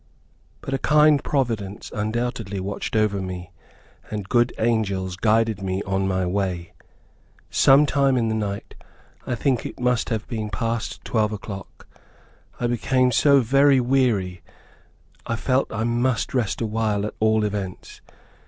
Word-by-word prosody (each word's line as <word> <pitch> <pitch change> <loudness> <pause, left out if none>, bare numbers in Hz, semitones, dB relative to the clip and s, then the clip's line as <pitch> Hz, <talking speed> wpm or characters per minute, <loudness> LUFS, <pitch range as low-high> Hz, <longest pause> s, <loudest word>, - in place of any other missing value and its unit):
But 135 - -5
a 135 - 0
kind 150 -1 +4
providence, 115 -8 -2
undoubtedly, 110 -2 -2
watched 100 +3 -4
over 105 -2 +1
me, 90 -1 -6 0.6
and 105 -3 -5
good 120 +2 +3
angels 100 -5 0
guided 110 +1 +1
me 95 0 -2
on 95 0 -1
my 95 -1 0
way. 90 -2 -2 0.8
Some 140 +2 +6
time 135 -2 +2
in 115 -2 +1
the 110 - 0
night, 105 -2 -4 0.5
I 120 - -1
think 125 0 0
it - - -7
must 125 -1 +1
have 110 -3 -2
been 110 -3 -4
past 115 +3 -3
twelve 110 -2 +1
o'clock, 100 -2 -8 0.7
I 120 - -1
became 125 +2 +2
so 140 +4 +5
very 135 +3 +4
weary 120 -9 +1 0.9
I 115 - -1
felt 130 +4 0
that - - -7
I 110 - -1
must 120 -1 0
rest 120 -5 -1
awhile 110 -2 0
at 105 - -4
all 110 0 +3
events. 100 -3 -5
110 Hz, 145 wpm, -23 LUFS, 100-125 Hz, 0.9 s, Some